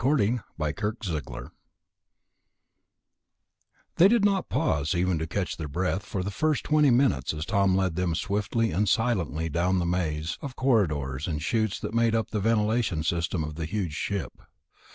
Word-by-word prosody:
11. 125 Hz, -4 st, +2 dB, 0.2 s
The 75 Hz, -2 st, -1 dB
Haunted 105 Hz, +3 st, -1 dB
Ship 80 Hz, -7 st, -5 dB, 2.5 s
They 180 Hz, -, +8 dB
did 225 Hz, -1 st, +3 dB
not 200 Hz, -2 st, +1 dB
pause, 70 Hz, +3 st, 0 dB
even 90 Hz, -1 st, +1 dB
to 80 Hz, -, -3 dB
catch 95 Hz, +3 st, -2 dB
their 80 Hz, -, -4 dB
breath, 90 Hz, +6 st, -1 dB
for 95 Hz, -2 st, -4 dB
the 100 Hz, -, -3 dB
first 155 Hz, +7 st, 0 dB
twenty 150 Hz, -1 st, +4 dB
minutes 120 Hz, -, +2 dB
as 75 Hz, +1 st, -4 dB
Tom 100 Hz, +1 st, +2 dB
led 95 Hz, -3 st, +1 dB
them 90 Hz, -2 st, 0 dB
swiftly 105 Hz, +4 st, 0 dB
and 100 Hz, +4 st, +1 dB
silently 95 Hz, -9 st, 0 dB
down 85 Hz, +3 st, 0 dB
through 95 Hz, -, +2 dB
the -, -, -1 dB
maze 85 Hz, -3 st, -2 dB
of 135 Hz, -3 st, -6 dB
corridors 75 Hz, -, +1 dB
and 75 Hz, -3 st, -2 dB
chutes 110 Hz, +5 st, 0 dB
that 105 Hz, +1 st, -4 dB
made 115 Hz, -1 st, +2 dB
up 115 Hz, -, -1 dB
the 105 Hz, -, -1 dB
ventilation 110 Hz, -5 st, +1 dB
system 85 Hz, 0 st, -1 dB
of 75 Hz, 0 st, -5 dB
the 80 Hz, +1 st, -4 dB
huge 90 Hz, -2 st, -3 dB
ship. 100 Hz, +4 st, -4 dB
95 Hz, 175 wpm, -27 LUFS, 80-115 Hz, 2.5 s, They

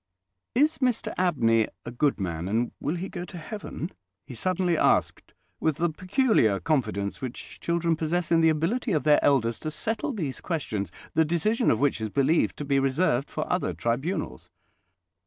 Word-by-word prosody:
"Is 300 Hz, +5 st, +3 dB
Mr 250 Hz, -4 st, 0 dB
Abney 115 Hz, -, +2 dB, 0.2 s
a 120 Hz, -, -5 dB
good 135 Hz, +2 st, +1 dB
man, 85 Hz, -2 st, -3 dB
and 115 Hz, +4 st, 0 dB
will 150 Hz, -, -1 dB
he 180 Hz, +2 st, -4 dB
go 175 Hz, -2 st, -6 dB
to 180 Hz, -, -9 dB
heaven?" 175 Hz, 0 st, -6 dB, 0.3 s
he 135 Hz, -, -9 dB
suddenly 180 Hz, +5 st, 0 dB
asked, -, -, +1 dB, 0.2 s
with 160 Hz, -2 st, +1 dB
the 175 Hz, +1 st, +1 dB
peculiar 185 Hz, -, +2 dB
confidence 110 Hz, -10 st, -1 dB
which 130 Hz, -2 st, -7 dB
children 170 Hz, -1 st, +1 dB
possess 165 Hz, +2 st, -1 dB
in 165 Hz, -1 st, +5 dB
the 160 Hz, -, +5 dB
ability 180 Hz, +9 st, 0 dB
of 155 Hz, -, +1 dB
their 150 Hz, -1 st, +4 dB
elders 115 Hz, -5 st, +2 dB
to 155 Hz, -, -3 dB
settle 220 Hz, -, -2 dB
these 160 Hz, -, -4 dB
questions, 110 Hz, -, -3 dB, 0.2 s
the 160 Hz, -, +4 dB
decision 175 Hz, +9 st, +1 dB
of 110 Hz, -, +2 dB
which 140 Hz, -5 st, +1 dB
is 110 Hz, -, -2 dB
believed 140 Hz, +8 st, +2 dB
to 145 Hz, -, -4 dB
be 140 Hz, -1 st, +2 dB
reserved 135 Hz, 0 st, +1 dB
for -, -, -3 dB
other -, -, -1 dB
tribunals. 120 Hz, -, -2 dB
155 Hz, 175 wpm, -26 LUFS, 120-180 Hz, 0.3 s, in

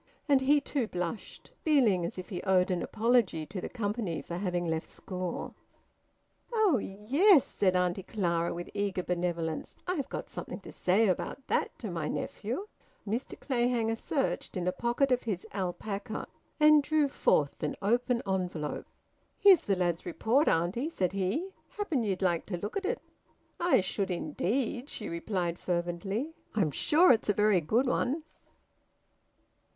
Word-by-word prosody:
And 280 Hz, -3 st, +4 dB
he 290 Hz, +3 st, +4 dB
too 275 Hz, -4 st, -2 dB
blushed, 180 Hz, +2 st, -5 dB
feeling 245 Hz, -, +3 dB
as -, -, -9 dB
if 185 Hz, -, -7 dB
he 180 Hz, -, -4 dB
owed 185 Hz, -1 st, +3 dB
an 180 Hz, -1 st, 0 dB
apology 225 Hz, -8 st, +1 dB
to 185 Hz, +3 st, -6 dB
the -, -, -5 dB
company 205 Hz, -6 st, -2 dB
for 170 Hz, -, -6 dB
having 180 Hz, -2 st, -1 dB
left 160 Hz, -1 st, -2 dB
school. 180 Hz, -2 st, -5 dB, 1.0 s
"Oh 425 Hz, -, +3 dB
yes!" 275 Hz, -, +4 dB
said 185 Hz, -2 st, +1 dB
Auntie 180 Hz, +1 st, +1 dB
Clara 170 Hz, -4 st, -1 dB
with 175 Hz, 0 st, -6 dB
eager 200 Hz, -3 st, -1 dB
benevolence. 170 Hz, -3 st, -2 dB
"I've 320 Hz, -7 st, -2 dB
got -, -, -5 dB
something -, -, -6 dB
to -, -, -10 dB
say 200 Hz, +5 st, +2 dB
about 195 Hz, +8 st, -2 dB
that -, -, 0 dB
to 215 Hz, -6 st, -5 dB
my 165 Hz, -3 st, -2 dB
nephew." 240 Hz, -, -3 dB, 0.4 s
Mr 230 Hz, +6 st, -3 dB
Clayhanger 240 Hz, -3 st, +1 dB
searched 265 Hz, -4 st, -2 dB
in 180 Hz, 0 st, -2 dB
a -, -, +3 dB
pocket 240 Hz, +6 st, 0 dB
of 250 Hz, -, +3 dB
his 200 Hz, -6 st, -3 dB
alpaca, 200 Hz, +3 st, -3 dB, 0.3 s
and 305 Hz, 0 st, +7 dB
drew 300 Hz, 0 st, +2 dB
forth 150 Hz, -, +1 dB
an 150 Hz, -, -1 dB
open 240 Hz, +4 st, +1 dB
envelope. 180 Hz, -6 st, -2 dB, 0.5 s
"Here's 390 Hz, -5 st, +7 dB
the 195 Hz, -, +1 dB
lad's 175 Hz, -2 st, 0 dB
report, 225 Hz, -, +1 dB
auntie," 180 Hz, -, +1 dB
said 185 Hz, -, 0 dB
he. 200 Hz, -, -1 dB, 0.2 s
"Happen 400 Hz, -11 st, -1 dB
ye'd 195 Hz, -4 st, -1 dB
like 175 Hz, -3 st, +1 dB
to 180 Hz, -, -3 dB
look 205 Hz, +5 st, -5 dB
at 400 Hz, -, -2 dB
it." 475 Hz, +5 st, 0 dB, 0.6 s
"I 345 Hz, -, +4 dB
should 195 Hz, +1 st, -2 dB
indeed!" 230 Hz, -, -1 dB
she 210 Hz, -, -5 dB
replied 175 Hz, 0 st, -2 dB
fervently. 180 Hz, -, -2 dB, 0.2 s
"I'm 185 Hz, -8 st, +2 dB
sure 325 Hz, -, +5 dB
it's 225 Hz, -3 st, +2 dB
a -, -, +5 dB
very 210 Hz, -3 st, +3 dB
good 225 Hz, -, +2 dB
one." 270 Hz, +4 st, 0 dB
205 Hz, 155 wpm, -30 LUFS, 180-255 Hz, 1.0 s, and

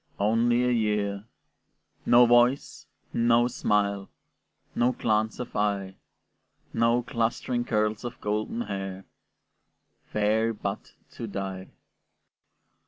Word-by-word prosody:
Only 115 Hz, +4 st, +2 dB
a 125 Hz, -, +2 dB
year, 105 Hz, -3 st, 0 dB, 0.8 s
no 120 Hz, +1 st, +7 dB
voice, 120 Hz, +3 st, +2 dB, 0.3 s
no 120 Hz, +1 st, +3 dB
smile, 100 Hz, -4 st, 0 dB, 0.6 s
No 125 Hz, +1 st, +2 dB
glance 110 Hz, -1 st, 0 dB
of 125 Hz, -, -6 dB
eye, 100 Hz, -2 st, -1 dB, 0.8 s
No 115 Hz, +1 st, +2 dB
clustering 120 Hz, 0 st, -1 dB
curls 105 Hz, -2 st, 0 dB
of 120 Hz, -, -6 dB
golden 105 Hz, +2 st, -2 dB
hair, 95 Hz, -3 st, -5 dB, 1.1 s
Fair 110 Hz, +2 st, +1 dB
but 100 Hz, -1 st, -5 dB, 0.2 s
to 115 Hz, -, -7 dB
die! 95 Hz, -2 st, -5 dB
110 Hz, 100 wpm, -27 LUFS, 100-120 Hz, 1.1 s, no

